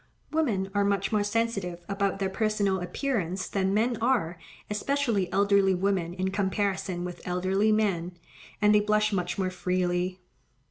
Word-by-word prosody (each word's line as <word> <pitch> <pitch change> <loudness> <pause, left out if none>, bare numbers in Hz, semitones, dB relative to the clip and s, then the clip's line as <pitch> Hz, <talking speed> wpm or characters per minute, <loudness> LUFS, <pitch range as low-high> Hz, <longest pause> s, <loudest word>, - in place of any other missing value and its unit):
Women 215 -12 0
are 205 -1 +2
much 200 -1 0
more 210 -2 +2
sensitive 205 -5 -2
about 200 -1 0
their 195 -1 0
personal 205 -2 +1
appearance 185 - -2
than 190 -1 0
men 225 +4 +1
are, 215 -9 +1 0.3
especially 215 -3 0
elderly 200 -1 +3
women 180 -2 0
in 190 0 -1
comparison 190 -2 -1
with 180 -1 -7
elderly 185 +4 +1
men, 185 -5 0 0.4
and 210 0 +5
they 210 - +6
blush 215 0 +2
much 180 -3 -1
more 185 -1 0
freely. 180 0 -1
195 Hz, 145 wpm, -27 LUFS, 185-210 Hz, 0.4 s, they